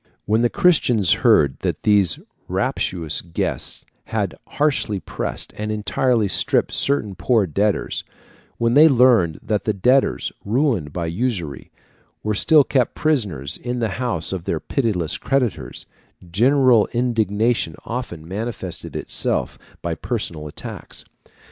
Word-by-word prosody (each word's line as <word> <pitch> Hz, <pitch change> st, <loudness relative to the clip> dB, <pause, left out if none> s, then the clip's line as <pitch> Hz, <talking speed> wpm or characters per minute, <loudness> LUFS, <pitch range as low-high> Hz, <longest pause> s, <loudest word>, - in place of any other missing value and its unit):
When 110 Hz, +3 st, +2 dB
the 120 Hz, -, +3 dB
Christians 135 Hz, -, +3 dB
heard 70 Hz, -2 st, +4 dB
that -, -, -3 dB
these 100 Hz, -6 st, +4 dB, 0.3 s
rapacious 80 Hz, -4 st, -1 dB
guests 85 Hz, -2 st, -3 dB, 0.2 s
had -, -, -2 dB
harshly 135 Hz, -9 st, 0 dB
pressed -, -, -4 dB
and 105 Hz, 0 st, -3 dB
entirely 110 Hz, +1 st, +1 dB
stripped -, -, +1 dB
certain 135 Hz, -8 st, +1 dB
poor 110 Hz, +1 st, +2 dB
debtors, 100 Hz, +5 st, -1 dB, 0.5 s
when 115 Hz, 0 st, +1 dB
they 155 Hz, +4 st, +7 dB
learned 120 Hz, -, +4 dB
that 105 Hz, -2 st, -1 dB
the 110 Hz, -, 0 dB
debtors, 125 Hz, +7 st, +2 dB
ruined 110 Hz, -, 0 dB
by 85 Hz, +2 st, -3 dB
usury, 85 Hz, -, -3 dB, 0.5 s
were 105 Hz, -, 0 dB
still 150 Hz, -, +5 dB
kept 130 Hz, -3 st, 0 dB
prisoners 105 Hz, -, -1 dB
in 125 Hz, 0 st, -4 dB
the 115 Hz, -2 st, 0 dB
house 95 Hz, -9 st, -1 dB
of 90 Hz, -3 st, -5 dB
their 80 Hz, -, -1 dB
pitiless 100 Hz, -, -1 dB
creditors, 130 Hz, -5 st, -2 dB, 0.5 s
general 125 Hz, +2 st, +4 dB
indignation 115 Hz, -6 st, 0 dB
often 115 Hz, -10 st, -5 dB
manifested 100 Hz, -2 st, -5 dB
itself -, -, -2 dB, 0.2 s
by -, -, -1 dB
personal 75 Hz, -2 st, -4 dB
attacks. 75 Hz, -, -8 dB
110 Hz, 125 wpm, -21 LUFS, 90-125 Hz, 0.5 s, they